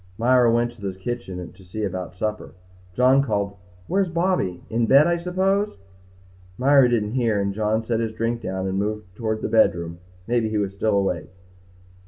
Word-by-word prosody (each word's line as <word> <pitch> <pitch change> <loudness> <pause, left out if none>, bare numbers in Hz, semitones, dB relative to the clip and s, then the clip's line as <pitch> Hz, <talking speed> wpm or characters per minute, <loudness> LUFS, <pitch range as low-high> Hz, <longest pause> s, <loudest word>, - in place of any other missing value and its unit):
Myra 120 0 +4
went 120 +1 +1
to 120 - -18
the 95 -2 -4
kitchen 95 -4 -5
to 95 - -17
see 100 +4 -5
about 90 -2 -4
supper. 105 0 -4 0.4
John 130 +2 +5
called, 100 -6 -1 0.3
"Where's 190 0 +1
Bobby? 170 - 0
In 115 +1 0
bed 140 +5 +7
I 170 0 +2
suppose." 190 - 0 0.8
Myra 135 0 +5
didn't 105 -3 0
hear 115 -4 +1
and 100 0 -1
John 110 +2 0
set 115 0 0
his 115 -1 -1
drink 115 +1 -2
down 95 -2 -3
and 95 0 -1
moved 105 -3 -4
toward 110 -1 -3
the - - 0
bedroom. 85 -6 +2 0.3
Maybe 115 -1 +1
he 110 - -1
was 100 -2 -1
still 100 +1 +1
awake. 90 -5 -1
110 Hz, 180 wpm, -23 LUFS, 100-125 Hz, 0.8 s, bed